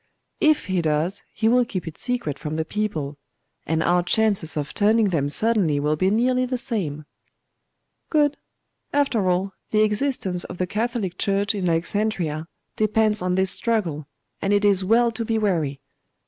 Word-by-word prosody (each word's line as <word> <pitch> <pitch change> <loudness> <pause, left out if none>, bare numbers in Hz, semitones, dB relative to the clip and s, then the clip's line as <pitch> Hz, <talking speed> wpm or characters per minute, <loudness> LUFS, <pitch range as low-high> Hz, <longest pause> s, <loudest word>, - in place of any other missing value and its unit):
'If 310 -1 +3
he 185 -2 0
does, 160 +5 0
he 220 - 0
will 245 +2 +4
keep 190 -8 -5
it 160 - -6
secret 245 - -3
from 150 0 -4
the 160 0 -1
people; 160 -9 -3 0.5
and 160 +1 +1
our 175 +1 +3
chances 190 -3 +1
of 150 0 -3
turning 215 0 +3
them 145 -5 0
suddenly 195 -5 +2
will 150 +1 +1
be 185 +5 +1
nearly 250 +4 +2
the 255 0 -2
same.' 175 - -3 1.0
'Good. 295 -2 +2 0.6
After 250 -9 +1
all, 190 +2 0 0.2
the 215 0 +3
existence 210 -5 0
of - - -8
the 185 - 0
Catholic 210 -2 -3
Church 200 0 +1
in 190 -4 -1
Alexandria 165 -2 -1 0.3
depends 215 -1 +2
on 180 0 0
this 190 0 +3
struggle, 170 -11 -1 0.3
and 195 - +1
it 205 0 +2
is 195 -2 +4
well 230 +4 +3
to 230 +1 -4
be 225 0 -1
wary. 165 -10 0
200 Hz, 165 wpm, -23 LUFS, 165-225 Hz, 1.0 s, will